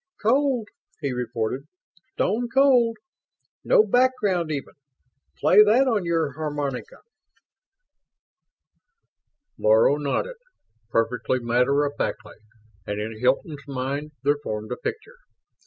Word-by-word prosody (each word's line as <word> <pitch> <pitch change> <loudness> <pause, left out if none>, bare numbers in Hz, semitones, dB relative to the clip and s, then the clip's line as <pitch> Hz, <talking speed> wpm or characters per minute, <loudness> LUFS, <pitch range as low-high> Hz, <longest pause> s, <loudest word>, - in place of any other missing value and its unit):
"Cold," 255 0 +1 0.3
he 140 -5 -2
reported. 125 +2 -3 0.5
"Stone 235 +5 -1
cold. 250 -4 +4 0.7
No - - +5
background 210 -10 +1
even. 140 -3 -5 0.6
Play - - +6
that 235 +6 +4
on 215 -7 +1
your 165 -3 0
harmonica!" 145 -4 -5 2.6
Laro 110 +6 +4
nodded, 150 - -2 0.5
perfectly 115 +2 0
matter 125 +4 +2
of 145 - -3
factly, - - -4 0.5
and 105 0 -3
in 110 +1 -5
Hilton's 140 +4 -1
mind 140 +3 -4
there 145 +1 +2
formed 105 -3 -5
a - - -3
picture. 450 +3 -6
145 Hz, 105 wpm, -24 LUFS, -, 2.6 s, Play